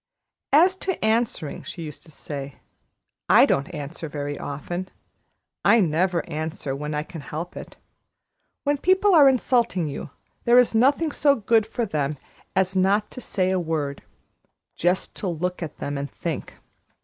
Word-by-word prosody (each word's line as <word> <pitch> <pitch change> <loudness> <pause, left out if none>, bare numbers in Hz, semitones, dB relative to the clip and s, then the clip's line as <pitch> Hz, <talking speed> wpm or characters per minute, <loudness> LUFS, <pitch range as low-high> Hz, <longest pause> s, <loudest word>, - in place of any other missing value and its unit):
"As 350 +6 +6
to 375 - -2
answering," 220 -9 0
she 170 - -7
used 150 -3 -8
to - - -14
say, 140 -3 -6 0.7
"I - - +8
don't 140 +6 0
answer 155 0 -6
very 145 0 -4
often. 175 +6 -5 0.7
I 230 - +6
never 175 0 +1
answer 155 -3 -4
when 150 +2 -4
I 150 - -1
can 160 0 -9
help 160 +5 -6
it. - - -9 0.9
When 290 -1 +1
people 380 +4 +4
are 290 -5 +8
insulting 235 -9 +1
you, 145 +1 -6 0.3
there 240 +1 +5
is 250 -2 +5
nothing 280 +7 +3
so 285 -1 +3
good 225 -1 +2
for 235 +1 -2
them 150 -6 -2 0.4
as 190 0 +1
not 200 +3 +2
to 255 - -7
say 185 -5 0
a 190 - +1
word 155 -4 -2 0.7
just 180 +2 0
to 200 - -3
look 180 +2 -2
at 165 - -6
them 145 0 -3
and 140 0 -4
think. 165 -4 -5
180 Hz, 160 wpm, -24 LUFS, 150-230 Hz, 0.9 s, I